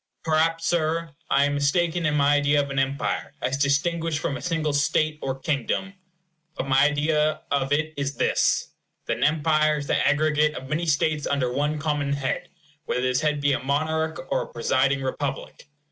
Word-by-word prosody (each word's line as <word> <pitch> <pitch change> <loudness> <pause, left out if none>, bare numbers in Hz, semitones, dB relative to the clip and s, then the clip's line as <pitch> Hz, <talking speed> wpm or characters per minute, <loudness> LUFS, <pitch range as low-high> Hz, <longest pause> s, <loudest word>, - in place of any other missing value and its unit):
Perhaps, 165 +1 +1
Sir, 165 -1 0 0.2
I 140 +1 +4
am 145 - 0
mistaken 165 +4 +1
in 150 - 0
my 145 0 +4
idea 145 0 +3
of 140 -1 -1
an 135 - 0
empire, 135 0 -2
as 130 - -1
distinguished 150 +3 0
from 140 - -2
a - - -6
single 165 -4 -1
state 155 +1 +1
or 135 -1 -3
kingdom. 155 +7 -2 0.6
But 135 - -4
my 135 +1 +4
idea 150 +1 +1
of 140 -1 0
it 155 +2 0
is 140 0 -2
this; - - +1 0.4
that - - -1
an - - -2
empire 155 0 +2
is 145 - -4
the - - +1
aggregate 150 +1 +2
of 130 - -8
many 165 +3 -1
states 150 0 +1
under 130 -3 0
one 150 +3 0
common 150 -2 -1
head, 140 -2 -3 0.4
whether 125 - -1
this 130 +1 +1
head 150 -2 0
be 145 0 +2
a - - 0
monarch 160 +4 -1
or - - +1
a - - -6
presiding 130 +3 +1
republic. 140 +2 -4
150 Hz, 185 wpm, -24 LUFS, 140-155 Hz, 0.6 s, I